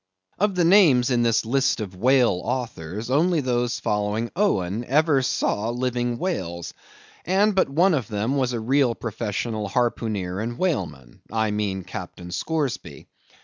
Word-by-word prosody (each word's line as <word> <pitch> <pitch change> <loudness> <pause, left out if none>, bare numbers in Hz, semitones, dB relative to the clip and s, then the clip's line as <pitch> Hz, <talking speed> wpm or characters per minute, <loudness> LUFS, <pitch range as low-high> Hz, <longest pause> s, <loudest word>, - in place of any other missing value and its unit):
Of 200 0 +1
the 175 -2 +2
names 160 - +5
in 120 -1 +2
this 115 -1 +2
list 135 +3 +1
of 100 -4 -5
whale 120 -3 +3
authors, 115 -4 -4
only 165 +4 +3
those 120 -3 -1
following 105 +2 -1
Owen 115 - 0
ever 145 +1 +3
saw 115 -3 0
living 120 0 -1
whales; 90 - -3 0.5
and 200 +4 +2
but 190 -5 +2
one 170 +7 +3
of 135 -7 -1
them 110 +4 -1
was 130 -3 +1
a 120 - -2
real 125 +1 +2
professional 110 -1 -3
harpooneer 105 -5 -1
and 120 +2 -4
whaleman. 85 - -3
I 110 -1 0
mean 100 -3 -2
Captain 90 -1 -8
Scoresby. 150 - -3
120 Hz, 145 wpm, -24 LUFS, 105-140 Hz, 0.5 s, names